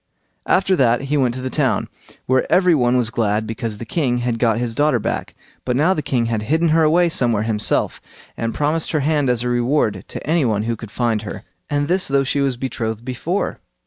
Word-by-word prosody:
After 190 0 +3
that 120 -3 +3
he 140 +2 -1
went 125 -3 +1
to 130 - -5
the 130 - -3
town, - - +1 0.4
where 130 0 +1
every 180 -1 +5
one 125 -4 +2
was 115 -3 0
glad 110 -2 0
because 110 -1 -4
the 115 - -7
king 125 -2 0
had 120 -1 -2
got 115 -2 +2
his 120 -1 -2
daughter 145 +1 +2
back; 110 - -3 0.3
but 125 - -1
now 155 +8 +3
the 155 - -2
king 125 -4 0
had 115 -2 -1
hidden 160 +9 +1
her 160 +1 +4
away 170 +3 +4
somewhere 120 -9 +1
himself, 110 -2 0 0.3
and 115 0 -2
promised 150 +6 -1
her 155 - +1
hand 145 -2 +1
as 120 -1 +1
a - - -1
reward 120 -5 +1
to - - -8
any 165 0 +2
one 110 -4 0
who 115 +1 -1
could 110 -1 -9
find 115 -1 0
her, 110 - -7 0.3
and 145 0 0
this 180 +3 +1
though 140 0 +2
she 140 +1 0
was 135 -3 0
betrothed 115 -3 -4
before. 155 +10 -2
125 Hz, 220 wpm, -20 LUFS, 115-150 Hz, 0.4 s, every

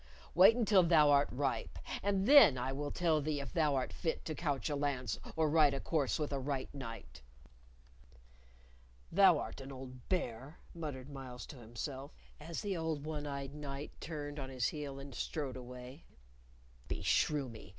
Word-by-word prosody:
Wait 190 +7 +8
until 215 -5 +5
thou 160 -4 +5
art 140 0 +4
ripe, 135 +1 -2 0.2
and 195 -1 +1
then 275 - +9
I 125 +2 -2
will 145 +1 -3
tell 160 -1 +1
thee 150 0 -1
if 140 -4 -6
thou 150 -4 +2
art 130 -1 -1
fit 165 -3 -2
to 155 - -3
couch 145 -4 -1
a 150 - -1
lance 140 -3 -1 0.2
or 160 -1 +2
ride 150 -2 +4
a - - -2
course 145 -5 0
with 150 -2 -2
a 140 - 0
right 135 0 -3
knight." 115 - -8 1.9
"Thou 185 -2 +6
art 140 - -5
an 135 +1 -8
old 130 -2 -10
bear!" 135 -4 -2 0.2
muttered 145 -5 -6
Myles 125 -4 -8
to 145 - -11
himself, 130 +5 -6 0.2
as 165 +2 -5
the 200 -2 -2
old 160 -3 -2
one 150 -1 -4
eyed 140 -1 -5
knight 145 -1 -6
turned 150 -2 -5
on 135 -1 -5
his 130 -3 0
heel 145 -3 -5
and 135 0 -9
strode 135 +2 -3
away. 125 +3 -9 0.8
"Beshrew 145 -3 +1
me! 115 -3 -11
145 Hz, 170 wpm, -34 LUFS, 130-155 Hz, 1.9 s, then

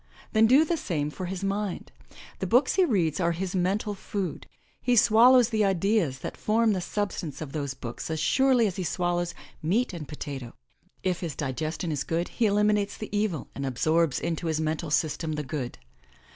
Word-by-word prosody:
Then 220 +1 +5
do 275 +7 +6
the 335 +1 0
same 150 - -2
for 185 +3 -5
his 190 +1 -5
mind. 200 -1 -2 0.5
The 190 - -2
books 250 +8 +4
he 380 - +4
reads 180 - +1
are 170 -1 +2
his 180 +2 -3
mental 195 +4 0
food. 195 -1 -4 0.3
He 245 - +2
swallows 235 +2 +6
the 220 -2 +1
ideas 195 -6 +1
that - - -4
form 220 0 +2
the 185 - -1
substance 180 -6 -3
of 155 -4 -6
those 140 -3 -3
books 120 +1 -6
as 160 -1 -2
surely 255 - +3
as 195 -2 -2
he 185 - -2
swallows 175 0 -1 0.3
meat 195 +9 +1
and 160 -4 -6
potato. 135 -5 -7 0.5
If 185 -2 0
his 165 -6 -4
digestion 155 +5 -3
is 145 -2 -1
good 170 +2 -2
he 230 - +1
eliminates 210 0 +2
the 215 -1 -6
evil 205 -8 -1
and 140 - -5
absorbs 155 +3 +1
into 165 0 -2
his 160 -1 0
mental 160 +1 -2
system 155 +1 0
the 150 0 -3
good. 130 -3 -4
180 Hz, 185 wpm, -27 LUFS, 155-210 Hz, 0.5 s, do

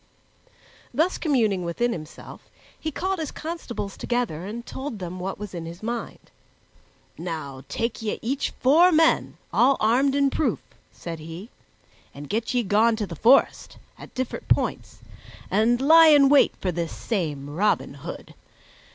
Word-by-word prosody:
Thus 320 +9 0
communing 225 - +1
within 205 +8 -1
himself, 155 -6 -9 0.3
he 315 - -3
called 375 +5 -2
his 310 -3 -3
constables 285 - -6
together 220 -9 -2
and 235 +3 -6
told 265 -4 -6
them 180 -1 -6
what 190 +2 -4
was 210 -2 -8
in 165 -2 -6
his 170 +4 -10
mind. 235 +1 -5 0.9
"Now 155 -6 -6
take 230 +11 -3
ye 215 -2 -2
each 265 +5 -1
four 320 +8 +6
men, 325 0 +3 0.2
all 270 +2 +4
armed 260 +6 +2
in 280 -1 +2
proof," 315 - -1 0.3
said 165 -2 -7
he, 165 +8 -9 0.6
"and 145 +1 -9
get 225 +5 -2
ye 245 - +2
gone 220 +3 +3
to 215 -1 -2
the 175 - -8
forest, 240 - +3 0.2
at - - -14
different 255 -1 -4
points, - - -1 0.5
and 225 +4 +3
lie 320 +4 +7
in 290 -3 +7
wait 285 -1 +5
for 185 - -2
this 170 -1 -3
same 155 - -3
Robin 185 +9 0
Hood. - - -9
225 Hz, 150 wpm, -24 LUFS, 180-275 Hz, 0.9 s, lie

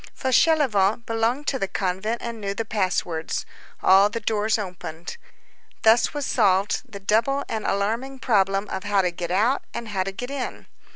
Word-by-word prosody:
Fauchelevent 245 -6 +3
belonged 230 +5 0
to 265 - -1
the 195 - -1
convent 190 +5 -2
and 235 -2 -5
knew 200 0 -3
the 225 - -3
pass 195 -4 0
words. 160 -2 -3 0.4
All 195 +2 +6
the 230 - -4
doors 220 0 +1
opened. 180 -5 -6 0.7
Thus 225 +2 +5
was 290 -2 -3
solved 200 -5 +2
the 200 - -7
double 225 +8 +1
and 220 -1 -3
alarming 230 +7 -1
problem 195 -5 +1
of 190 - -4
how 200 -2 +2
to 180 - +1
get 170 0 -5
out 220 +9 +2
and 230 -1 -5
how 195 -2 -1
to 190 +1 -2
get 245 +7 -6
in. 275 -3 -5
210 Hz, 175 wpm, -24 LUFS, 195-235 Hz, 0.7 s, All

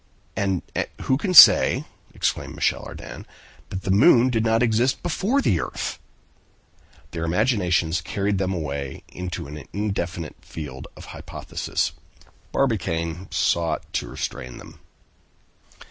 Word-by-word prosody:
"And 95 -3 0 0.4
who 130 - +2
can 185 +6 -1
say," 145 - +9 0.3
exclaimed - - -2
Michel - - 0
Ardan, - - -9 0.4
"that 95 - -5
the 95 - -1
moon 120 - +6
did 110 -2 +1
not 115 +1 +2
exist 120 +3 +1
before 205 - 0
the 85 - +2
earth?" - - -4 1.1
Their 85 -1 -4
imaginations 90 -3 +1
carried 100 +3 -1
them 95 -1 0
away 70 -6 -4
into 90 -1 -5
an 75 +1 -8
indefinite 90 -5 -3
field 70 -5 -8
of - - -10
hypothesis. - - -3 0.6
Barbicane 85 -8 -1
sought 85 -3 0
to - - -1
restrain 65 -1 -5
them. - - -13
95 Hz, 120 wpm, -23 LUFS, 80-115 Hz, 1.1 s, say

